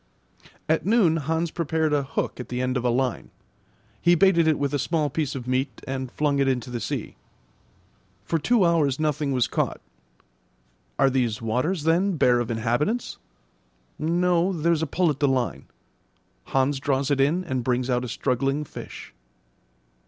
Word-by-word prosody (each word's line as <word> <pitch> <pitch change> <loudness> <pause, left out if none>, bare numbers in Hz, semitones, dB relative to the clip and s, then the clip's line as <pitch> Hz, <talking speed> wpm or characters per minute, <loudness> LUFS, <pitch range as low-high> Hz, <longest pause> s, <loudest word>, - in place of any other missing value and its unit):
At 160 +1 +1
noon 195 -6 +3
Hans 160 +2 -1
prepared 160 -2 0
a 145 - +3
hook 135 -1 -3
at 125 - -7
the 125 - -3
end 130 0 -1
of 125 - -1
a 125 - +2
line. 125 +1 -1 0.7
He 175 0 +5
baited 170 -2 +4
it 155 - +3
with 140 0 -1
a 145 - +1
small 150 0 0
piece 145 -2 -2
of 125 -2 -6
meat 130 +1 -1
and 130 -1 -4
flung 145 -2 0
it 135 - +2
into 125 -2 -1
the 120 - -3
sea. - - -4 1.1
For 165 +9 0
two 215 +5 +3
hours 155 -5 +2
nothing 150 -2 0
was 125 -4 +2
caught. - - -2 1.2
Are 135 -1 +4
these 120 -5 0
waters, 130 +10 -1
then, 175 +5 +2
bare 125 -3 +4
of 120 - -2
inhabitants? 120 - -1 0.8
No, 175 +3 +2
there's 165 -2 +1
a 160 - -1
pull 175 +2 +1
at 145 - -6
the 145 - +3
line. 130 -3 -1 0.8
Hans 135 +1 +1
draws 140 0 0
it 135 -1 +2
in 160 +7 +2
and 130 -8 -2
brings 125 0 0
out 125 -1 0
a - - -4
struggling 135 +5 -1
fish. - - -10
140 Hz, 170 wpm, -25 LUFS, 130-165 Hz, 1.2 s, He